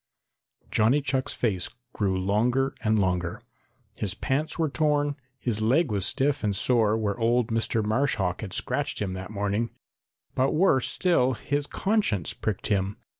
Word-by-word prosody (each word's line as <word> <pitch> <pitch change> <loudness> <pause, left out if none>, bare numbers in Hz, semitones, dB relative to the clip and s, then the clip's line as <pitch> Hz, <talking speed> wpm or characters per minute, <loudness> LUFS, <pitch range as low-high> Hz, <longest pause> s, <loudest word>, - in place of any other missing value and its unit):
Johnny 115 +7 +4
Chuck's 135 -2 -1
face 95 -7 0 0.2
grew 95 -3 0
longer 120 +8 +1
and 110 -1 +2
longer. 90 -3 0 0.6
His 100 -3 0
pants 150 +4 -1
were 165 -2 +1
torn, 145 -1 +1 0.2
his 115 -4 -2
leg 130 +6 +2
was 100 -3 +1
stiff 135 -1 0
and 105 -2 0
sore 110 0 +3
where 105 0 -2
old 120 +1 +2
Mr. 115 -1 0
Marsh 130 +7 +1
Hawk 90 -3 -1
had 105 -4 -6
scratched - - -1
him 95 -3 -2
that 95 +1 -6
morning, 105 +2 -1 0.6
but 130 +1 +1
worse 150 -6 +3
still 130 -9 +2
his 145 +1 -2
conscience 195 - 0
pricked 105 -4 -3
him. 100 0 0
115 Hz, 155 wpm, -26 LUFS, 100-135 Hz, 0.6 s, Johnny